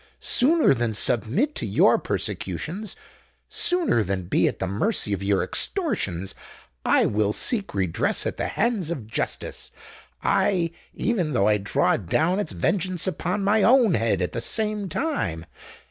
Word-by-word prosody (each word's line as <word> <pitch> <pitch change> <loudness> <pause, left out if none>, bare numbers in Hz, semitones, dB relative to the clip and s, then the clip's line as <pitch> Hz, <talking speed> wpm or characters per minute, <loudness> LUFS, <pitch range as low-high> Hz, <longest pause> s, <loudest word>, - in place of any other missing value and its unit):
Sooner 305 - +4
than 120 -3 -1
submit 125 - +1
to - - -3
your 100 - +4
persecutions—sooner 195 - -2
than 95 -1 -2
be 85 - +2
at - - -2
the - - -2
mercy 105 - 0
of 100 - -3
your 100 -1 +1
extortions,—I 95 - -2
will 105 0 +1
seek 205 - -1
redress 95 -4 0
at - - -3
the - - -2
hands 215 -7 -1
of 140 -10 -4
justice—aye, 170 - -2 0.2
even 180 -11 -1
though 100 -4 +2
I 105 0 +4
draw 100 - +1
down 160 - 0
its 205 - -3
vengeance 180 - -1
upon 185 +2 -2
my 210 +2 +3
own 235 -3 +5
head 110 - +1
at 90 - -2
the 115 - -4
same 210 - -2
time!" 115 - -2
155 Hz, 140 wpm, -24 LUFS, -, 0.2 s, own